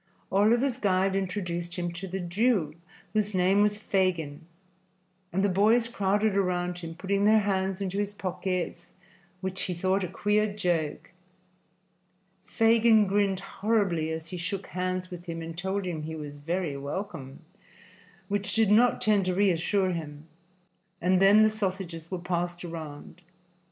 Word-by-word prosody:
Oliver's 235 Hz, +6 st, +3 dB
guide 190 Hz, -2 st, +2 dB
introduced 180 Hz, -3 st, -3 dB
him 175 Hz, -2 st, -2 dB
to 180 Hz, +3 st, -6 dB
the 190 Hz, +1 st, -4 dB
Jew, 180 Hz, -2 st, +1 dB, 0.4 s
whose 210 Hz, -2 st, 0 dB
name 185 Hz, +2 st, +4 dB
was 210 Hz, 0 st, +2 dB
Fagin, 170 Hz, -7 st, -1 dB, 0.8 s
and 195 Hz, +3 st, 0 dB
the -, -, +4 dB
boys 215 Hz, +5 st, +3 dB
crowded 205 Hz, -2 st, +1 dB
around 180 Hz, -2 st, 0 dB
him, 165 Hz, -1 st, -7 dB
putting 195 Hz, +2 st, -1 dB
their 215 Hz, +1 st, +5 dB
hands 195 Hz, -1 st, -1 dB
into 195 Hz, 0 st, -2 dB
his 205 Hz, 0 st, -1 dB
pockets, 185 Hz, -2 st, -4 dB, 0.5 s
which 190 Hz, 0 st, -3 dB
he 180 Hz, -, -3 dB
thought 185 Hz, +3 st, +1 dB
a -, -, -1 dB
queer 210 Hz, +4 st, +1 dB
joke. 170 Hz, -7 st, -1 dB, 1.3 s
Fagin 225 Hz, -1 st, +4 dB
grinned 195 Hz, -1 st, +1 dB
horribly 195 Hz, -7 st, 0 dB
as 160 Hz, 0 st, -5 dB
he 180 Hz, -, -5 dB
shook 190 Hz, +3 st, -4 dB
hands 185 Hz, 0 st, -3 dB
with 175 Hz, -1 st, -8 dB
him 165 Hz, -2 st, -5 dB
and 165 Hz, 0 st, -7 dB
told 190 Hz, +3 st, -2 dB
him 170 Hz, -4 st, -3 dB
he 160 Hz, +1 st, -5 dB
was 145 Hz, -2 st, -7 dB
very 165 Hz, 0 st, -2 dB
welcome, 145 Hz, -1 st, -6 dB, 0.9 s
which 200 Hz, 0 st, -1 dB
did 220 Hz, -2 st, +3 dB
not 240 Hz, +3 st, +4 dB
tend 210 Hz, -2 st, +3 dB
to 185 Hz, -1 st, 0 dB
reassure 190 Hz, 0 st, +2 dB
him, 155 Hz, -3 st, -6 dB, 0.7 s
and 185 Hz, +1 st, +2 dB
then 205 Hz, +2 st, +7 dB
the -, -, +6 dB
sausages 185 Hz, -6 st, -4 dB
were 185 Hz, -, -3 dB
passed 175 Hz, 0 st, -3 dB
around. 160 Hz, 0 st, -8 dB
185 Hz, 150 wpm, -28 LUFS, 175-205 Hz, 1.3 s, then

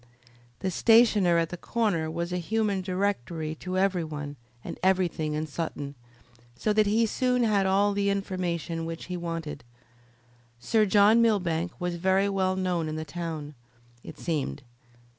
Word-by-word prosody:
The 190 Hz, -, -1 dB
stationer 215 Hz, -5 st, +5 dB
at 165 Hz, -1 st, +1 dB
the 175 Hz, -, -6 dB
corner 195 Hz, -8 st, 0 dB
was 170 Hz, +2 st, -3 dB
a 180 Hz, -, 0 dB
human 205 Hz, +1 st, 0 dB
directory 180 Hz, -5 st, -2 dB
to 185 Hz, 0 st, -3 dB
every 190 Hz, -2 st, +2 dB
one 150 Hz, -2 st, -6 dB, 0.3 s
and -, -, -7 dB
everything 180 Hz, -5 st, +1 dB
in 155 Hz, +1 st, -1 dB
Sutton, 145 Hz, -2 st, -5 dB, 0.6 s
so 210 Hz, -, 0 dB
that 215 Hz, -1 st, +3 dB
he 225 Hz, +3 st, +3 dB
soon 250 Hz, +2 st, +1 dB
had 205 Hz, -4 st, +2 dB
all 200 Hz, +2 st, +3 dB
the 200 Hz, 0 st, +1 dB
information 175 Hz, -4 st, -2 dB
which 165 Hz, 0 st, -6 dB
he 180 Hz, -, -5 dB
wanted. 165 Hz, -4 st, -5 dB, 1.0 s
Sir 215 Hz, -, +2 dB
John 210 Hz, +3 st, +5 dB
Millbank 180 Hz, -7 st, +1 dB
was 180 Hz, -1 st, -2 dB
very 190 Hz, +3 st, +2 dB
well 190 Hz, -1 st, +1 dB
known 180 Hz, -4 st, -1 dB
in 155 Hz, -, -4 dB
the 155 Hz, 0 st, -4 dB
town, 160 Hz, -2 st, -5 dB, 0.5 s
it -, -, -10 dB
seemed. 150 Hz, -3 st, -3 dB
180 Hz, 155 wpm, -27 LUFS, 165-200 Hz, 1.0 s, stationer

